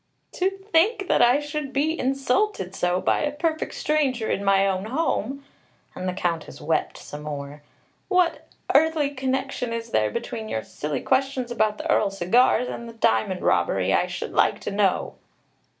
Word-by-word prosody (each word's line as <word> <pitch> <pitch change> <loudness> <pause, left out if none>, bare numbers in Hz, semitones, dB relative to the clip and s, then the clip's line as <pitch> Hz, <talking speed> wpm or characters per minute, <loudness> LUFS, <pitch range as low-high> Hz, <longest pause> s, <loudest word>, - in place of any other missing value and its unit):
"To 375 +1 +1
think 390 +1 +1
that - - +4
I 245 +4 +5
should 295 -1 -4
be 310 +4 0
insulted 270 - 0
so 180 -1 0
by - - +2
a 295 - 0
perfect 315 +2 -2
stranger 270 -7 0
in 200 - -1
my 195 0 +4
own 190 0 -1
home!" 275 0 -1 0.5
And 185 0 -3
the - - -2
Countess 170 -3 -3
wept 160 +1 -1
some 145 - -9
more. 145 -1 -6 0.5
"What 360 -3 +1 0.3
earthly 305 -1 +3
connection 265 -2 -2
is 230 0 -4
there 110 0 +2
between 220 - -5
your 110 - -2
silly 150 0 -4
questions 265 -2 0
about 215 -2 +1
the - - -5
Earl's 195 -2 +1
cigars 240 +7 +3
and 235 0 -6
the - - -10
diamond 180 - +1
robbery, - - +2
I - - +2
should - - -5
like - - +3
to - - -4
know?" 200 -2 +1
245 Hz, 165 wpm, -24 LUFS, 190-295 Hz, 0.5 s, I